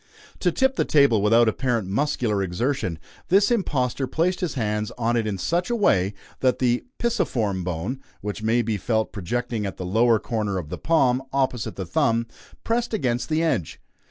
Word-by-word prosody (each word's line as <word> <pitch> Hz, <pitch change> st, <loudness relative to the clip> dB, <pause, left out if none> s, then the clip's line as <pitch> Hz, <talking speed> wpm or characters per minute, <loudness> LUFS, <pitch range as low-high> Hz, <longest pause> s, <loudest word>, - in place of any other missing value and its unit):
To -, -, +2 dB
tip 265 Hz, 0 st, +1 dB
the -, -, +3 dB
table 140 Hz, -8 st, +4 dB
without 115 Hz, +3 st, +5 dB
apparent 120 Hz, -3 st, 0 dB
muscular 110 Hz, -2 st, 0 dB
exertion, 95 Hz, -, -1 dB, 0.3 s
this 200 Hz, +4 st, +4 dB
impostor 135 Hz, -, 0 dB
placed 175 Hz, +7 st, 0 dB
his 175 Hz, -6 st, -2 dB
hands 105 Hz, -2 st, -1 dB
on 120 Hz, 0 st, +1 dB
it 115 Hz, -2 st, 0 dB
in 100 Hz, -2 st, -2 dB
such 170 Hz, -, -1 dB
a 240 Hz, -, +1 dB
way 100 Hz, -, +2 dB, 0.2 s
that 130 Hz, -1 st, +2 dB
the 125 Hz, -1 st, +1 dB
"pisiform 115 Hz, -, 0 dB
bone" 90 Hz, +10 st, -3 dB, 0.2 s
(which 105 Hz, +1 st, -5 dB
may 115 Hz, +2 st, +2 dB
be 110 Hz, -1 st, -1 dB
felt 110 Hz, +2 st, 0 dB
projecting 115 Hz, +3 st, -2 dB
at 95 Hz, -, -6 dB
the 90 Hz, -, -5 dB
lower 115 Hz, +5 st, +3 dB
corner 105 Hz, -3 st, -2 dB
of 80 Hz, -5 st, -5 dB
the -, -, -5 dB
palm, 135 Hz, -6 st, +2 dB
opposite 130 Hz, -4 st, -1 dB
the 95 Hz, -, -4 dB
thumb) 115 Hz, +7 st, +1 dB, 0.4 s
pressed 235 Hz, 0 st, 0 dB
against 125 Hz, -, -1 dB
the 160 Hz, +1 st, +1 dB
edge. 95 Hz, -, -1 dB
120 Hz, 180 wpm, -24 LUFS, 105-140 Hz, 0.4 s, without